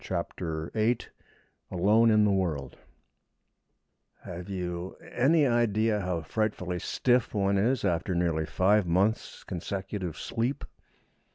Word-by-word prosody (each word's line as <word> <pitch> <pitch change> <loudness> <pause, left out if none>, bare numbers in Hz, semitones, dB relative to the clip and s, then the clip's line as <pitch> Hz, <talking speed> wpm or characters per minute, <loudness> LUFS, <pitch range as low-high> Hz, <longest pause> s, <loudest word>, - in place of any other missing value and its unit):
CHAPTER 85 -2 -4
VIII 115 +2 +2 0.7
ALONE 105 +6 +4
IN 110 -1 +5
THE 105 - +3
WORLD 80 -9 -1 1.5
Have 90 +2 -7
you 90 -1 -4 0.2
any 145 +5 +3
idea 115 -3 +2
how 90 -3 -2
frightfully 90 0 -2
stiff 125 +2 +1
one 100 -1 +2
is 120 +3 +1
after 90 0 0
nearly 85 -2 0
five 100 0 +3
months' 95 +6 0
consecutive 95 0 -4
sleep? 125 +5 -2
95 Hz, 110 wpm, -28 LUFS, 90-110 Hz, 1.5 s, IN